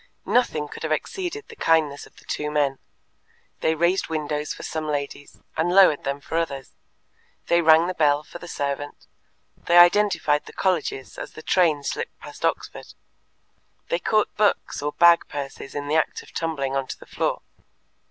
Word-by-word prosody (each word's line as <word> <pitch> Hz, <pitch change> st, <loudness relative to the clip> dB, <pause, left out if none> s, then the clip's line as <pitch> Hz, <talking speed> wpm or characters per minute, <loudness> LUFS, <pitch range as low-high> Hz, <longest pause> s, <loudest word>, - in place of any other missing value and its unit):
Nothing 160 Hz, -12 st, +1 dB
could -, -, -10 dB
have 160 Hz, -, -3 dB
exceeded 375 Hz, -, -3 dB
the 460 Hz, -, -12 dB
kindness 155 Hz, -, +1 dB
of -, -, -25 dB
the -, -, -18 dB
two 150 Hz, 0 st, -3 dB
men. 145 Hz, -3 st, 0 dB, 0.8 s
They 160 Hz, -, +1 dB
raised 170 Hz, +4 st, +1 dB
windows 150 Hz, -1 st, -2 dB
for -, -, -7 dB
some 155 Hz, -1 st, -4 dB
ladies, 145 Hz, -1 st, -4 dB, 0.2 s
and 160 Hz, +2 st, +1 dB
lowered 185 Hz, -6 st, +5 dB
them 140 Hz, +1 st, -2 dB
for 165 Hz, +3 st, -2 dB
others, 140 Hz, -5 st, -4 dB, 0.8 s
they 170 Hz, 0 st, +4 dB
rang 160 Hz, 0 st, +6 dB
the 185 Hz, -, -2 dB
bell 150 Hz, -3 st, +2 dB
for 175 Hz, -, -11 dB
the 175 Hz, -, -10 dB
servant, 145 Hz, -2 st, -4 dB, 0.5 s
they 175 Hz, -, +1 dB
identified 175 Hz, -4 st, +4 dB
the -, -, -11 dB
colleges 165 Hz, -8 st, -2 dB
as -, -, -7 dB
the 155 Hz, -, -11 dB
train 160 Hz, -6 st, +2 dB
slipped -, -, -4 dB
past -, -, -12 dB
Oxford, -, -, -3 dB, 0.9 s
they 170 Hz, -, 0 dB
caught 215 Hz, +3 st, +1 dB
books 210 Hz, -7 st, +1 dB
or 145 Hz, +1 st, -2 dB
bag 170 Hz, -1 st, +5 dB
purses 140 Hz, -1 st, -7 dB
in 145 Hz, 0 st, -4 dB
the 155 Hz, +2 st, +2 dB
act 160 Hz, -, -1 dB
of -, -, -18 dB
tumbling 140 Hz, -5 st, -2 dB
on 135 Hz, -1 st, -1 dB
to -, -, -6 dB
the -, -, -13 dB
floor. -, -, -2 dB
155 Hz, 175 wpm, -24 LUFS, 145-175 Hz, 0.9 s, rang